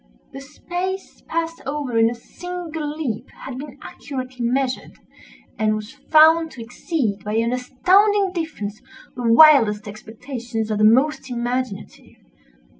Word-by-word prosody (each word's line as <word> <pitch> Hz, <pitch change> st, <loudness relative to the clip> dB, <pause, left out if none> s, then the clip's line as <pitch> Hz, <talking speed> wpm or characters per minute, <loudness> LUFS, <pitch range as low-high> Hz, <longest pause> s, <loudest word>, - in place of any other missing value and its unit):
The 270 Hz, -, -8 dB
space 355 Hz, +6 st, -5 dB
passed 330 Hz, 0 st, -3 dB
over 275 Hz, -3 st, -3 dB
in 225 Hz, 0 st, +5 dB
a 240 Hz, -, -5 dB
single 325 Hz, +3 st, -6 dB
leap 265 Hz, -6 st, -4 dB, 0.2 s
had 260 Hz, -1 st, -6 dB
been 285 Hz, -1 st, -9 dB
accurately 255 Hz, -3 st, -6 dB
measured, 255 Hz, +2 st, -1 dB, 0.7 s
and 215 Hz, 0 st, +2 dB
was 215 Hz, +1 st, -7 dB
found 320 Hz, +1 st, +5 dB
to 250 Hz, -, -9 dB
exceed, 230 Hz, -, -3 dB
by 210 Hz, +1 st, -3 dB
an 230 Hz, +2 st, +1 dB
astounding 380 Hz, +11 st, +3 dB
difference, 290 Hz, -, -5 dB, 0.3 s
the 240 Hz, -2 st, 0 dB
wildest 230 Hz, -7 st, +6 dB
expectations 225 Hz, +1 st, -6 dB
of 210 Hz, -, -1 dB
the -, -, +2 dB
most 265 Hz, +6 st, +3 dB
imaginative. 245 Hz, -3 st, -4 dB
255 Hz, 130 wpm, -21 LUFS, 230-315 Hz, 0.7 s, wildest